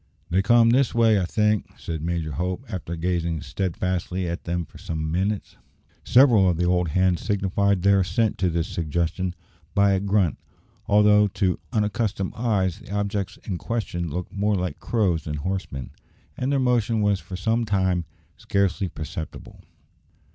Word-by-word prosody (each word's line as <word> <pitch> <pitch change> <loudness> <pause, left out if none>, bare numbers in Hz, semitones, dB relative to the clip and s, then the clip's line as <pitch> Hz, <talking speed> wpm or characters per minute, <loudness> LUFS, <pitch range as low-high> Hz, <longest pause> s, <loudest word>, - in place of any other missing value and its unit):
"They 95 +2 +3
come 115 +2 +5
this 130 0 +2
way, 115 -3 +4
I 90 - 0
think," 105 +3 0
said 80 -2 -5
Major 85 -1 -2
Hope, 90 - -3
after 90 -5 -5
gazing 85 -2 -1
steadfastly 90 0 -2
at 85 +1 -4
them 85 0 -2
for - - -16
some 80 -1 -3
minutes. 95 +4 -2 0.5
Several 120 -8 +6
of 85 - 0
the 90 - +1
old 90 0 +2
hands 90 +2 +2
signified 100 -1 +1
their 100 0 +5
assent 95 +4 0
to 95 - +2
this 85 -1 -1
suggestion 85 +3 -2 0.4
by 100 0 +4
a 95 - +2
grunt, 100 -5 +1 0.5
although 105 0 +5
to 95 -2 0
unaccustomed 105 -3 -1
eyes 100 -7 0
the - - -13
objects 100 -1 -2
in 90 -5 -4
question 85 -7 -3
looked 90 +4 -5
more 105 +1 +1
like 90 -1 -3
crows 95 -9 0
than 75 - -3
horsemen, 75 -6 -4 0.4
and 130 +2 -1
their 140 - +2
motion 115 -4 +2
was 100 -2 +2
for 95 - -8
some 110 +6 0
time 95 -5 +1 0.3
scarcely 100 0 0
perceptible. 80 +1 -7
95 Hz, 160 wpm, -24 LUFS, 85-105 Hz, 0.5 s, Several